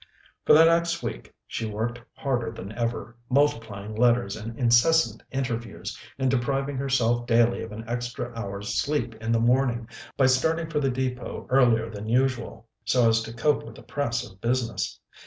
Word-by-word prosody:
For - - +8
the 160 +2 +8
next 170 0 +2
week - - -5
she 115 - -4
worked 115 +3 -3
harder 120 -4 -1
than 105 -3 -8
ever, 115 -1 -3
multiplying 115 -7 0
letters 120 -2 +2
and 115 +2 -7
incessant 120 0 +4
interviews, 120 -5 -4 0.2
and 130 -1 +1
depriving 135 +2 0
herself 120 -3 +1
daily 120 0 +3
of 115 - -7
an 110 +1 -8
extra 120 0 -4
hour's 100 -2 -5
sleep 120 +2 0
in 115 0 -2
the 115 - +3
morning 120 -1 +2 0.3
by 135 - +4
starting 160 +6 +2
for 150 - +1
the 135 -2 +1
Depôt 125 -1 -3
earlier 120 -4 +4
than 110 -1 -7
usual, 120 -2 0 0.2
so 115 +2 +3
as 115 0 +3
to 115 - -6
cope 145 +6 +1
with - - -11
the - - -13
press 125 -5 -2
of 95 +1 -18
business. 120 -1 -1
120 Hz, 170 wpm, -26 LUFS, 115-135 Hz, 0.3 s, For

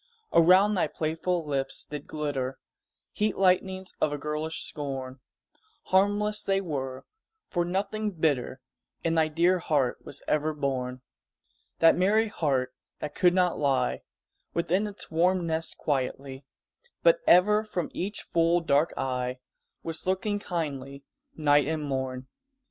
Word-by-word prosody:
Around 185 +5 +6
thy 185 - +1
playful 165 +2 -2
lips 135 -2 -1
did 150 -1 -7
glitter 135 -4 -3 0.5
Heat 210 -1 -1
lightnings 190 0 +1
of 150 - +2
a 145 - -2
girlish 150 +2 -3
scorn; 135 -3 -5 0.6
Harmless 205 +2 +2
they 195 0 +1
were, 135 -8 -4 0.5
for 175 -3 +1
nothing 200 +4 -1
bitter 150 -7 -1 0.4
In 165 - +1
thy 160 -1 +3
dear 170 +4 +2
heart 140 -7 0
was - - -8
ever 155 +1 +1
born 130 -3 -2 0.8
That 165 0 +6
merry 210 +4 +3
heart 130 -8 0 0.2
that 150 -1 -5
could 180 -1 +3
not 180 -2 +2
lie 130 - +1 0.5
Within 185 +5 +1
its 205 -4 -5
warm 175 +2 +2
nest 160 0 -2
quietly, 135 -1 -3 0.6
But - - +5
ever 210 +4 +6
from 185 -6 -4
each 200 +3 -4
full, 170 +1 +2
dark 155 -1 +2
eye 125 -1 -2 0.5
Was 165 +2 -4
looking 205 +2 0
kindly 140 -7 -4 0.3
night 145 -2 +3
and 155 -1 -2
morn. 130 -2 -3
160 Hz, 130 wpm, -27 LUFS, 140-185 Hz, 0.8 s, Around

